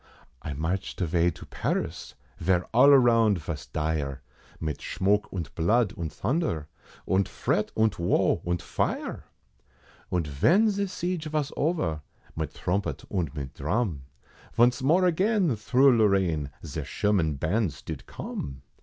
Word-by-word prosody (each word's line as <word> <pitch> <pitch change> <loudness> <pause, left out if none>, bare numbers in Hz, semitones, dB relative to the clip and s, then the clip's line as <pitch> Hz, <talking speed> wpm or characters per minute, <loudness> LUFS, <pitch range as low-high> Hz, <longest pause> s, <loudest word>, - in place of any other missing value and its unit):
I 75 - -5
marched 80 +7 -3
avay 85 -1 +2
to - - -9
Paris, - - -3 0.2
vere 90 +1 +2
all 130 +5 +7
around 115 -6 +5
vos 80 -2 -6
dire, 75 -3 -2 0.4
Mit 80 -2 -3
shmoke, 105 +2 0
und 85 -4 -5
blood, 105 +6 +2
und 80 -3 -4
thunder, 115 - -1 0.4
und 95 0 +1
fret, 105 - -1
und 110 -5 +2
woe 85 - +2
und 85 0 -2
fire! - - -2 0.8
Und 90 -3 0
ven 175 - +3
ze 200 0 -1
siege 180 -3 -3
vos 150 -1 -1
over, 115 - 0 0.3
mit 80 -1 -3
thrumpet 100 +3 -2
und 85 -7 -2
mit 70 -2 -5
dhrum, 85 - -1 0.6
Vonce 120 +2 +4
more 170 +8 +4
again 185 - +2
thro' 125 +6 +4
Lorraine, 95 -9 +2 0.2
ze 75 0 -4
Sherman 85 0 +1
bands 80 - -1
did - - -7
come. 65 -1 -6
95 Hz, 135 wpm, -27 LUFS, 80-125 Hz, 0.8 s, all